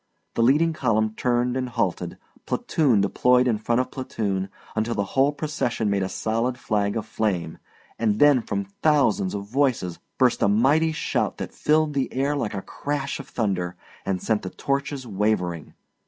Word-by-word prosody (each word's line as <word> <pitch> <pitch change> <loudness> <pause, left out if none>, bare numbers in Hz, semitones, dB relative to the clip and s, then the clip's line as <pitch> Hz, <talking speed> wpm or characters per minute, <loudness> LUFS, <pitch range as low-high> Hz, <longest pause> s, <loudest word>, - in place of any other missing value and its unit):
The - - 0
leading 150 +7 +4
column 110 -6 +1
turned 125 +1 0
and 130 -1 -2
halted, 95 -7 -2 0.3
platoon 130 -10 +2
deploys 125 +5 +3
in 115 -4 +1
front 120 +3 +1
of 130 - -5
platoon 100 -7 -2 0.3
until 110 +2 0
the 100 - +1
whole 135 +2 +4
procession 145 -8 -1
made 100 -1 +1
a 95 - -1
solid 115 +5 -1
flag 105 -2 0
of 110 - -3
flame, 95 -7 -2 0.4
and 110 -2 +1
then 145 -2 +6
from 100 -2 -3 0.2
thousands 135 -11 +3
of 100 0 -4
voices 120 -7 0 0.2
burst 125 -2 +3
a - - +4
mighty 140 +10 +3
shout 155 - -1
that - - -6
filled 155 0 +2
the 135 -2 -1
air 140 +3 0
like 115 -7 -2
a 95 - -4
crash 140 -1 -3
of 140 - -8
thunder, 90 -5 -1 0.3
and 95 -2 -2
sent 110 -2 +1
the 95 - -5
torches 140 +2 -2
wavering. 95 -6 -1
115 Hz, 170 wpm, -24 LUFS, 100-135 Hz, 0.4 s, then